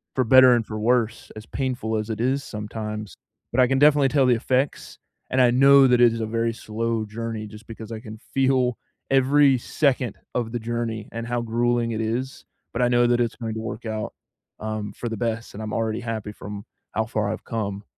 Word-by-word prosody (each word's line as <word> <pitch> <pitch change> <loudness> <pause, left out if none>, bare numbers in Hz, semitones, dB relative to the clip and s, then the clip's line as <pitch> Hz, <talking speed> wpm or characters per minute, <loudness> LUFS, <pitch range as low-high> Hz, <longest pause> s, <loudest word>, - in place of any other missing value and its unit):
for 130 - +2
better 130 +1 +8
and 115 - 0
for 110 0 -5
worse, 115 0 0
as 110 0 -9
painful 125 -4 -2
as 110 +1 -3
it 110 0 -3
is 135 +2 +1
sometimes. 105 -1 -6 0.4
But 125 - -1
I 125 - +5
can 135 - +1
definitely 145 -1 +5
tell 140 -1 +3
the 125 - +5
effects, 130 +4 -1 0.3
and 130 - 0
I 125 -1 +5
know 135 +2 +7
that 125 -1 +4
it 120 -1 +7
is 115 - -4
a - - 0
very 115 +1 0
slow 115 0 -2
journey 110 0 -5
just 105 +1 -13
because 110 -1 -9
I 110 - -5
can 110 -2 -9 0.2
feel 130 -3 +2 0.3
every 135 +1 +5
second 130 -3 0 0.2
of 120 -2 -1
the 120 - -2
journey 115 -1 -3
and 115 0 -5
how 120 0 -1
grueling 120 0 0
it 110 0 -2
is, 120 +4 -3 0.3
but 120 - -1
I 125 - +4
know 120 0 +4
that 120 0 +2
it's 115 - -1
going 115 -2 -4
to 110 - -4
work 115 +1 -6
out, 110 -1 -4 0.5
um, 110 -1 -4
for 120 - -5
the 115 - -4
best, 115 0 -3
and 105 - -7
I'm 110 0 -5
already 110 0 -1
happy 110 -2 -4
from 105 +1 -8 0.3
how 110 - 0
far 105 -2 -1
I've - - -6
come. 100 -3 -3
115 Hz, 215 wpm, -24 LUFS, 110-125 Hz, 0.5 s, better